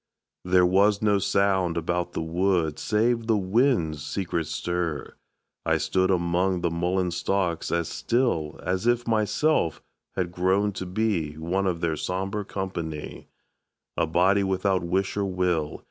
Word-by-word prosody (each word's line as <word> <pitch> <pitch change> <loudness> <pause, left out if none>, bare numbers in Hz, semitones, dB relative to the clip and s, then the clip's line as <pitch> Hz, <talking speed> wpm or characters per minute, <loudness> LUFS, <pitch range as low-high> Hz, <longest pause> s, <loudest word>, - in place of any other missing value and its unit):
There 90 0 +4
was 100 +3 +3
no 105 -2 +3
sound 95 -4 +1
about 85 +1 -1
the - - -2
wood 85 -1 0
Save 115 +2 +1
the 110 -2 +3
wind's 95 - +1
secret 85 -4 -2
stir. 85 -4 -3 0.5
I - - +2
stood 95 0 +1
Among 90 0 +1
the 85 - 0
mullein 90 +2 0
stalks 90 -1 -1
as 85 -1 0
still 115 - -1
As 95 +5 -1
if 120 0 +2
myself 110 - +1 0.4
had 90 -2 -1
grown 95 +3 +1
to 95 -1 -6
be 90 -6 -1
One 90 +5 -1
of 85 -2 -1
their 80 -2 0
sombre 95 +5 -2
company, 85 -6 -5 0.7
A - - +1
body 95 +5 +3
without 95 0 +1
wish 95 +3 -1
or 100 -1 0
will. 90 -5 -1
95 Hz, 145 wpm, -26 LUFS, 85-100 Hz, 0.7 s, There